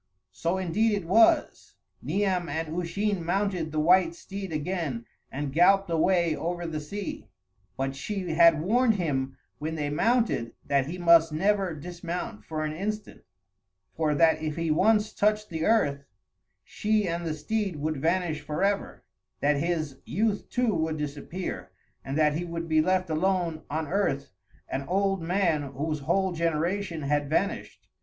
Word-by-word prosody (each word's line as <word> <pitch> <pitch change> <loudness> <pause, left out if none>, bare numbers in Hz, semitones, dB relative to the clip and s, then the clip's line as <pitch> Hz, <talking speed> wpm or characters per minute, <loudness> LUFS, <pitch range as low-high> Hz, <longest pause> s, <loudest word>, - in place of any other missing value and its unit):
So 165 - -1
indeed 190 +5 +1
it 200 -4 -2
was; 220 +7 +3 0.3
Niam 190 -3 0
and 160 +2 -3
Usheen 180 +2 -1
mounted 180 -2 -1
the 155 - -1
white 170 +1 +4
steed 195 +1 -7
again 150 -6 -3 0.3
and 140 0 -4
galloped 195 +3 +4
away 170 0 +2
over 175 +2 -3
the 160 -2 -3
sea, 195 +7 -6 0.5
but 135 0 -2
she 190 +6 -4
had 165 -1 +5
warned 230 +4 +3
him 135 -7 -2 0.2
when 160 +2 -3
they 145 -2 -2
mounted 225 - +1
that 140 -1 +1
he 175 +4 -5
must 170 -2 +5
never 190 +2 +1
dismount 170 - -6
for 155 -1 -3
an 155 - -3
instant, 210 +5 -4 0.7
for 155 -2 +1
that 160 +1 +4
if 155 -1 -2
he 165 -1 -1
once 210 +6 +3
touched 210 -1 +1
the 160 -1 -2
earth, 145 -11 +2 0.6
she 210 -2 0
and 170 0 -2
the 160 -2 -2
steed 195 +4 -2
would 155 +1 -2
vanish 165 +1 0
forever, 195 +7 -1 0.4
that 145 0 +2
his 155 -3 -1
youth 210 +2 -1
too 245 -3 +1
would 160 -2 -1
disappear, 150 +5 -5 0.3
and 135 +2 -3
that 150 -1 +4
he 165 +4 -2
would 170 -1 -5
be 155 -1 +3
left 185 +2 +1
alone 170 -1 0
on 155 +1 -2
earth 145 -6 -1 0.4
an 135 - -3
old 195 0 +1
man 170 -2 +1
whose 145 +3 -3
whole 190 +7 +1
generation 170 +1 -1
had 145 0 0
vanished. 195 +6 -2
170 Hz, 155 wpm, -27 LUFS, 155-195 Hz, 0.7 s, had